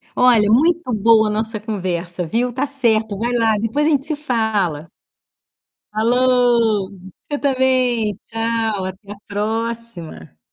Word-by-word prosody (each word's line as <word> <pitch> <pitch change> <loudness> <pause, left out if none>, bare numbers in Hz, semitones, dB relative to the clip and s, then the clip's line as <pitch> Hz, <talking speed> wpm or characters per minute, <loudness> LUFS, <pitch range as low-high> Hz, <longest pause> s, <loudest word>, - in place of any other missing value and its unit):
Olha, 235 -4 +4
muito 315 +1 +2
boa 220 +1 +4
a - - -1
nossa 220 0 -2
conversa, 180 -4 -3
viu, 240 +8 -1
tá 270 +3 -1
certo, 225 -6 0
vai 235 +4 -2
lá, 225 -2 +2
depois 250 +8 0
a - - +3
gente 280 -2 +1
se 310 -1 -1
fala. 215 - -1 1.0
Falou, 235 -2 +2 0.3
você 290 -1 -4
também. 255 -6 +1
Tchau, 225 -3 -2
até 190 +2 -8
a - - -7
próxima. 210 - -5
225 Hz, 130 wpm, -19 LUFS, 205-250 Hz, 1.0 s, Olha